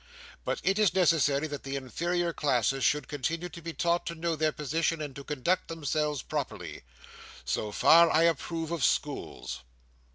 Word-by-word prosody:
But - - -2
it 195 +2 +2
is 205 -4 +3
necessary 155 -5 +3
that 145 -2 -5
the 135 0 -5
inferior 170 +6 -1
classes 135 -2 +1
should 150 -3 +2
continue 165 +5 -3
to 170 +1 -10
be 165 0 -5
taught 170 +3 0
to 170 - -3
know 165 0 -1
their 155 0 +1
position, 160 +3 -1
and 145 -3 -5
to 140 - -8
conduct 150 +7 -1
themselves 150 -3 -2
properly. - - -5 0.6
So 105 - -2
far 165 +10 +6
I 160 - +4
approve 165 0 0
of 170 -6 -2
schools. 65 - -1
155 Hz, 165 wpm, -29 LUFS, 140-170 Hz, 0.6 s, far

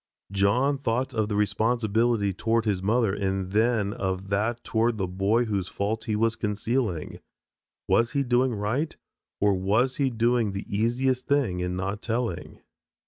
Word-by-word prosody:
John 120 +9 +2
thought 130 0 -1
of 110 -2 0
the 105 - -1
responsibility 110 0 +1
toward 115 +4 0
his 100 -4 0
mother 110 +1 +2
and 95 -2 -2
then 110 -1 +2
of 95 0 -3
that 110 +4 -1
toward 115 0 +1
the 95 - 0
boy 100 +6 +1
whose 100 -5 -2
fault 105 +4 -3
he 110 - -1
was 115 +1 +1
concealing. 105 - -2 0.7
Was 115 0 +2
he 140 - +1
doing 125 -1 +2
right 115 +10 -2 0.4
or 105 0 +3
was 105 +8 +1
he 140 -2 +2
doing 115 -2 +1
the 100 - -5
easiest 125 +4 0
thing 130 -11 +1
in 90 0 -2
not 100 +3 -3
telling? 115 -6 -3
110 Hz, 155 wpm, -26 LUFS, 100-120 Hz, 0.7 s, or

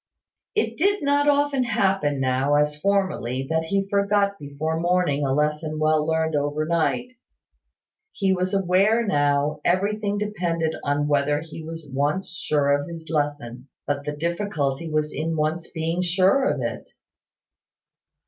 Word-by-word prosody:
It 430 - 0
did 400 +2 +2
not 285 +1 +3
often 285 -2 +2
happen 190 - +1
now, 130 +2 +1
as 150 0 +2
formerly, 150 -8 0
that 160 0 +1
he 195 +3 0
forgot 200 0 +1
before 150 +3 -3
morning 175 -4 +1
a 135 - 0
lesson 150 +2 0
well 155 0 +2
learned 160 0 0
over 145 +1 0
night. 170 +9 0 1.0
He 195 -2 +1
was 185 0 -1
aware 195 +4 +3
that - - -5
now 145 +1 +1
everything 205 +3 0
depended 175 -6 -1
on 145 +1 0
whether 145 0 +1
he 160 0 -9
was 165 -1 -8
once 145 +8 -1
sure 145 -4 +1
of 145 - -8
his 165 -1 -8
lesson; 145 -5 -2 0.2
but 145 0 -2
the 150 - -3
difficulty 165 -3 -2
was 155 -1 -1
in 160 +3 -2
once 155 +2 -1
being 165 +2 -2
sure 185 +9 +3
of - - -1
it. - - -5
160 Hz, 150 wpm, -24 LUFS, 145-195 Hz, 1.0 s, not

